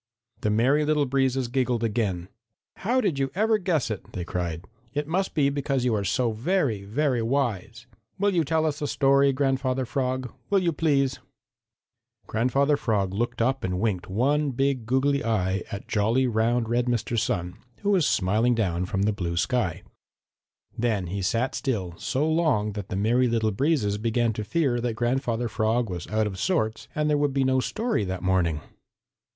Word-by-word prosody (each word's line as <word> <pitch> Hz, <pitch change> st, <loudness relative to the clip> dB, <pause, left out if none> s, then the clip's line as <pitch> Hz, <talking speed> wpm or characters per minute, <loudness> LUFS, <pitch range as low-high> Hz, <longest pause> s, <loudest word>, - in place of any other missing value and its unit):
The 105 Hz, -, 0 dB
Merry 130 Hz, +8 st, +3 dB
Little 150 Hz, -1 st, +2 dB
Breezes 135 Hz, -1 st, +1 dB
giggled 125 Hz, -2 st, 0 dB
again. 105 Hz, -6 st, -1 dB, 0.5 s
"How 245 Hz, +6 st, +1 dB
did 175 Hz, -, 0 dB
you 135 Hz, 0 st, 0 dB
ever 220 Hz, +2 st, +2 dB
guess 165 Hz, -, 0 dB
it?" 105 Hz, -, -7 dB
they 90 Hz, -, -4 dB
cried. 85 Hz, -1 st, -3 dB, 0.3 s
"It 145 Hz, 0 st, -1 dB
must 190 Hz, +4 st, -1 dB
be 140 Hz, -3 st, +3 dB
because 135 Hz, -2 st, -1 dB
you 120 Hz, -, +2 dB
are 105 Hz, -2 st, 0 dB
so 115 Hz, +5 st, +1 dB
very, 120 Hz, -, 0 dB
very 125 Hz, +4 st, 0 dB
wise. 115 Hz, -3 st, -2 dB, 0.3 s
Will 200 Hz, +1 st, +2 dB
you 170 Hz, -2 st, +3 dB
tell 160 Hz, +2 st, +1 dB
us 150 Hz, -1 st, -2 dB
a 145 Hz, -, -1 dB
story, 140 Hz, 0 st, +3 dB
Grandfather 130 Hz, -1 st, 0 dB
Frog? 130 Hz, 0 st, -2 dB, 0.2 s
Will 200 Hz, -, +3 dB
you 175 Hz, -3 st, +1 dB
please?" 140 Hz, -4 st, +1 dB, 1.1 s
Grandfather 135 Hz, +6 st, +1 dB
Frog 100 Hz, -7 st, 0 dB
looked 115 Hz, +2 st, -1 dB
up 135 Hz, +2 st, 0 dB
and 90 Hz, -1 st, -1 dB
winked 100 Hz, -5 st, -1 dB
one 140 Hz, +9 st, +1 dB
big, 135 Hz, -2 st, -1 dB
goggly 140 Hz, +3 st, +2 dB
eye 95 Hz, -4 st, 0 dB
at 100 Hz, -, -6 dB
jolly, 115 Hz, +5 st, +2 dB
round, 115 Hz, 0 st, +1 dB
red 120 Hz, +2 st, 0 dB
Mr. 120 Hz, -1 st, -1 dB
Sun, 90 Hz, -6 st, -1 dB, 0.2 s
who 205 Hz, -, +1 dB
was 180 Hz, -7 st, +3 dB
smiling 110 Hz, +6 st, +2 dB
down 90 Hz, -5 st, 0 dB
from 95 Hz, +1 st, -1 dB
the 105 Hz, +1 st, +2 dB
blue 85 Hz, -3 st, -3 dB
sky. 115 Hz, -5 st, 0 dB, 0.9 s
Then 110 Hz, -5 st, 0 dB
he 100 Hz, -, -2 dB
sat 115 Hz, +7 st, 0 dB
still 100 Hz, -10 st, -2 dB
so 145 Hz, +4 st, 0 dB
long 155 Hz, -10 st, +1 dB
that 105 Hz, -1 st, -6 dB
the -, -, -3 dB
Merry 120 Hz, +6 st, +2 dB
Little 115 Hz, -2 st, +1 dB
Breezes 105 Hz, -4 st, +1 dB
began 115 Hz, +1 st, +1 dB
to 110 Hz, -, -4 dB
fear 130 Hz, -2 st, 0 dB
that 120 Hz, -2 st, -2 dB
Grandfather 120 Hz, 0 st, 0 dB
Frog 110 Hz, 0 st, 0 dB
was 85 Hz, -1 st, -5 dB
out 110 Hz, 0 st, +1 dB
of 95 Hz, -3 st, -4 dB
sorts 110 Hz, -, -1 dB
and 150 Hz, -, 0 dB
that -, -, +1 dB
there 150 Hz, -, +3 dB
would 145 Hz, -2 st, +1 dB
be 135 Hz, -, +3 dB
no 130 Hz, 0 st, +2 dB
story 225 Hz, -, -1 dB
that 95 Hz, 0 st, -4 dB
morning. 90 Hz, -5 st, +1 dB
120 Hz, 180 wpm, -26 LUFS, 105-140 Hz, 1.1 s, Merry